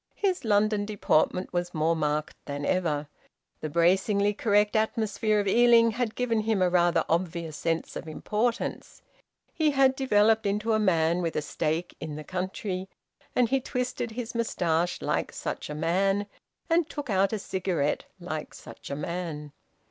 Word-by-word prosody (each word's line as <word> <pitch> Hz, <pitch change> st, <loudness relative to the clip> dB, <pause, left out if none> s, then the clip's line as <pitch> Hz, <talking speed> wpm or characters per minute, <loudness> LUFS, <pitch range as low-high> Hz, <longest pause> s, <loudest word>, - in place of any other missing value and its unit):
His 380 Hz, -3 st, 0 dB
London 210 Hz, -1 st, +2 dB
deportment 190 Hz, -3 st, +1 dB
was 175 Hz, 0 st, -2 dB
more 160 Hz, +2 st, +2 dB
marked 150 Hz, -1 st, -1 dB
than 145 Hz, 0 st, -4 dB
ever. 155 Hz, -5 st, 0 dB, 0.5 s
The 155 Hz, -, -4 dB
bracingly 195 Hz, +5 st, +2 dB
correct 210 Hz, 0 st, +2 dB
atmosphere 215 Hz, -1 st, +1 dB
of 200 Hz, -, -1 dB
Ealing 230 Hz, +2 st, +5 dB
had 230 Hz, 0 st, -2 dB
given 235 Hz, -3 st, 0 dB
him 215 Hz, -1 st, 0 dB
a 180 Hz, -1 st, +2 dB
rather 175 Hz, -2 st, +3 dB
obvious 170 Hz, -2 st, -1 dB
sense 165 Hz, 0 st, -2 dB
of -, -, -6 dB
importance. 220 Hz, +9 st, -2 dB, 0.5 s
He 315 Hz, -2 st, +2 dB
had 270 Hz, -2 st, +4 dB
developed 220 Hz, -4 st, +3 dB
into 210 Hz, +3 st, 0 dB
a 215 Hz, -, +3 dB
man 170 Hz, -3 st, +2 dB
with 165 Hz, -2 st, -2 dB
a -, -, +1 dB
stake 160 Hz, +3 st, -2 dB
in 155 Hz, -1 st, -5 dB
the 155 Hz, -, -6 dB
country, 185 Hz, +2 st, -4 dB, 0.5 s
and 245 Hz, -2 st, +3 dB
he 270 Hz, -, +2 dB
twisted 250 Hz, -1 st, -3 dB
his 240 Hz, 0 st, -5 dB
moustache 175 Hz, -7 st, 0 dB
like -, -, -1 dB
such -, -, -5 dB
a 150 Hz, -, -4 dB
man, 195 Hz, +6 st, +1 dB, 0.4 s
and 330 Hz, -1 st, +2 dB
took 290 Hz, -6 st, -5 dB
out 195 Hz, 0 st, +3 dB
a 220 Hz, -, -1 dB
cigarette 185 Hz, -7 st, -1 dB
like 155 Hz, -3 st, -5 dB
such -, -, -11 dB
a 140 Hz, -, -3 dB
man. 150 Hz, -1 st, -4 dB
195 Hz, 160 wpm, -27 LUFS, 165-220 Hz, 0.5 s, Ealing